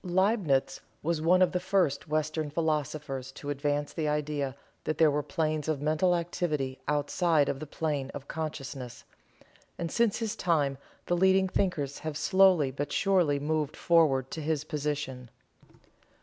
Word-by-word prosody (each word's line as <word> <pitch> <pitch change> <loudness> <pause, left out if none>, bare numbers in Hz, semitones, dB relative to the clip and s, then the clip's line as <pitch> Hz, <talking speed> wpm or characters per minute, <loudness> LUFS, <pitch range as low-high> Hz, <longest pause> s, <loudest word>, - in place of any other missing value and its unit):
Liebnitz 185 - +1 0.2
was 165 0 0
one 180 +3 +5
of 180 - +2
the 180 - 0
first 180 -7 +1
Western 155 0 -1
philosophers 150 -4 -2
to 145 +1 -5
advance 145 +1 -1
the 155 -2 -2
idea 150 -3 -1 0.3
that 155 - -2
there 160 -2 +5
were 145 +1 0
planes 155 -2 -2
of 155 -3 0
mental 155 +5 +2
activity 155 -6 -2
outside 150 +1 +2
of 135 - -2
the 155 - -7
plane 145 -3 -2
of 140 -1 -8
consciousness, 135 -5 -6 0.7
and 170 -1 -3
since 235 -3 +2
his 225 -2 -2
time 150 -8 +1 0.3
the 175 - +1
leading 190 +1 +4
thinkers 155 -8 -1
have 155 -1 -4
slowly 185 -6 +4
but 145 +2 -4
surely 175 -8 +2
moved 150 0 -1
forward 150 -7 +3
to 160 - -4
his 155 -1 -1
position. 145 -5 -3
155 Hz, 150 wpm, -29 LUFS, 145-170 Hz, 0.7 s, one